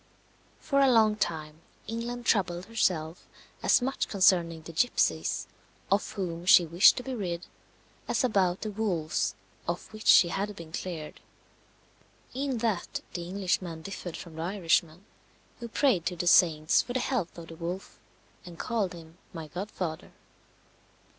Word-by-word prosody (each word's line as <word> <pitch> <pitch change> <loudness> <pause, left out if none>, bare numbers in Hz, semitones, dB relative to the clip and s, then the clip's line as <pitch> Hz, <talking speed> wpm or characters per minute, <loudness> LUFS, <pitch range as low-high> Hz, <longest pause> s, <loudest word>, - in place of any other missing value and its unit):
For 275 -2 0
a 275 -1 +5
long 220 -3 +4
time 155 -5 -3 0.2
England 235 +2 -5
troubled 180 -5 +1
herself 175 -7 -1 0.3
as - - +4
much 270 +2 -1
concerning 175 -4 +3
the 165 - -9
gipsies, 85 - +1 0.5
of 200 +1 +1
whom 175 -3 -4
she 175 - +8
wished 170 +4 +6
to 250 - -3
be 265 - -5
rid 180 -7 -4 0.6
as - - +1
about 195 -7 +1
the 215 - -3
wolves 170 - -1 0.3
of 175 +5 -4
which 215 0 -8
she 170 - +7
had 205 +3 -3
been 165 -4 -10
cleared. 160 -3 -6 1.1
In 270 -1 -2
that 210 -6 -2
the 175 -1 -5
Englishman 180 -3 -2
differed 180 -3 -6
from 165 -2 -10
the - - -4
Irishman, 170 -1 0 0.5
who 235 - -6
prayed 225 - +1
to 180 - -2
the 175 - -3
saints 160 -3 +5
for 245 - -6
the 255 - +1
health 240 -10 -2
of 165 -1 -9
the 165 - -9
wolf, 175 +3 -6 0.4
and 175 -2 -11
called 215 -5 -1
him 165 -1 -13
"my 160 -3 -7
godfather." 180 -2 -5
180 Hz, 150 wpm, -28 LUFS, 165-215 Hz, 1.1 s, she